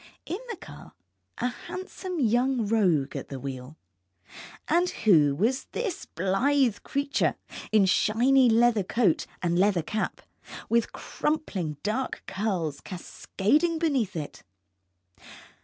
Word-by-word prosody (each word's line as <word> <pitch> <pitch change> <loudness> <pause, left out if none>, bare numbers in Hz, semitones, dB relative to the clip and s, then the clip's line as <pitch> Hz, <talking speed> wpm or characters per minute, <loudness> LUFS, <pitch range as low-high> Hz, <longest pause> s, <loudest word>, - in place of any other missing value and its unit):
In 365 - -4
the 460 - -3
car, - - -12 0.4
a - - -2
handsome 365 +4 -6
young 245 0 +2
rogue 185 -10 +2
at - - -5
the 135 - -6
wheel, 135 +2 -7 0.9
and 350 +3 +2
who 155 -10 +4
was 235 - 0
this 425 -8 -3
blithe 225 - +1
creature 280 0 0 0.4
in 215 -2 +5
shiny 245 +7 +4
leather 230 -1 +4
coat 190 -3 +1 0.2
and 175 0 +1
leather 190 -4 +3
cap, 215 +6 -3 0.5
with 235 0 +1
crumpling 195 - -3
dark 250 +6 -2
curls 185 -8 -2
cascading 280 - -1
beneath 280 - 0
it? 150 -3 -6
220 Hz, 115 wpm, -27 LUFS, 180-275 Hz, 0.9 s, in